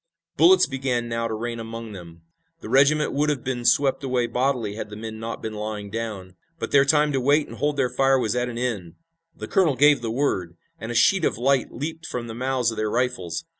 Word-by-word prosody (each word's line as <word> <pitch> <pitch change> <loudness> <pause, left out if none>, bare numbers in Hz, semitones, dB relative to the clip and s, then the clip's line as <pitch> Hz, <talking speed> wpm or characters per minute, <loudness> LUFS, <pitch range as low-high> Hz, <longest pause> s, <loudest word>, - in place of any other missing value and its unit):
Bullets 375 +2 +6
began 130 -3 -2
now 115 0 -2
to 110 - -3
rain 115 +1 -4
among 115 0 -7
them. 85 -4 -11 0.4
The - - -8
regiment 145 +3 +3
would 150 +2 +1
have 145 -5 -2
been 125 -2 -3
swept 140 +2 +3
away 125 -2 0
bodily 125 -3 -1
had 105 0 -6
the 105 - -8
men 110 0 -7
not 115 +1 -6
been 110 - -4
lying 105 -1 -5
down. 105 -5 -5 0.2
But - - -5
their 140 -1 +5
time 150 +1 +3
to 135 -2 0
wait 145 +4 +3
and - - -10
hold 150 0 -1
their 135 -2 +2
fire 135 0 +4
was 110 -4 -1
at 125 0 -1
an 120 - -6
end. 105 -9 -3 0.4
The - - -7
colonel 175 -8 +2
gave 145 -1 +5
the 115 - -3
word, 95 -9 -1 0.2
and 110 - -5
a - - -4
sheet 190 +8 +4
of - - +1
light 130 +2 +1
leaped 160 +5 -6
from 120 -1 -4
the 115 - -7
mouths 125 0 0
of 110 - -8
their 110 0 -1
rifles. 120 -8 -2
120 Hz, 230 wpm, -24 LUFS, 110-140 Hz, 0.4 s, Bullets